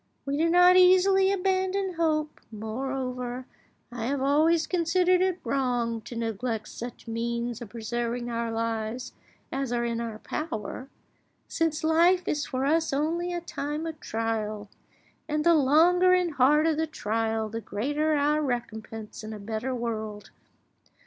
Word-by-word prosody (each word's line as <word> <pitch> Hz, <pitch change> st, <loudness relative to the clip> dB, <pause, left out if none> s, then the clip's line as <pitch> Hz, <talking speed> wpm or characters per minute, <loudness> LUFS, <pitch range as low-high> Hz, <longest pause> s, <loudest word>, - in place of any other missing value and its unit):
We 280 Hz, 0 st, -1 dB
do 325 Hz, +3 st, +2 dB
not 360 Hz, +1 st, +6 dB
easily 380 Hz, +1 st, +5 dB
abandon 380 Hz, 0 st, 0 dB
hope; 310 Hz, -2 st, -1 dB
moreover, 250 Hz, +3 st, -4 dB, 0.5 s
I 235 Hz, -2 st, -4 dB
have 275 Hz, +3 st, -1 dB
always 310 Hz, +4 st, +3 dB
considered 360 Hz, +1 st, +2 dB
it 370 Hz, -1 st, +1 dB
wrong 245 Hz, -4 st, 0 dB
to 240 Hz, -, -8 dB
neglect 225 Hz, -1 st, -3 dB
such 240 Hz, 0 st, -8 dB
means 235 Hz, +1 st, -3 dB
of 235 Hz, -, -7 dB
preserving 235 Hz, +1 st, -3 dB
our 230 Hz, -1 st, -2 dB
lives 225 Hz, +1 st, -3 dB, 0.4 s
as 270 Hz, -2 st, -2 dB
are 240 Hz, 0 st, 0 dB
in 235 Hz, 0 st, -2 dB
our 225 Hz, -2 st, -5 dB
power, 255 Hz, -1 st, -5 dB, 0.6 s
since 320 Hz, -1 st, -1 dB
life 340 Hz, +3 st, +4 dB
is 295 Hz, -, -1 dB
for 260 Hz, 0 st, -2 dB
us 320 Hz, +3 st, +2 dB
only 330 Hz, +5 st, 0 dB
a 350 Hz, 0 st, -3 dB
time 300 Hz, -1 st, -4 dB
of 320 Hz, -2 st, -6 dB
trial, 215 Hz, -3 st, -3 dB, 0.6 s
and 300 Hz, -1 st, 0 dB
the 340 Hz, +1 st, +5 dB
longer 335 Hz, +5 st, +5 dB
and 360 Hz, -3 st, +2 dB
harder 300 Hz, +4 st, +4 dB
the 320 Hz, +1 st, -1 dB
trial 225 Hz, -5 st, -1 dB
the 225 Hz, +2 st, -5 dB
greater 290 Hz, +10 st, -1 dB
our 295 Hz, +1 st, +2 dB
recompense 225 Hz, -5 st, -5 dB
in 215 Hz, 0 st, -6 dB
a 210 Hz, -, -7 dB
better 220 Hz, +5 st, -3 dB
world. 220 Hz, -3 st, -4 dB
265 Hz, 145 wpm, -27 LUFS, 230-325 Hz, 0.6 s, not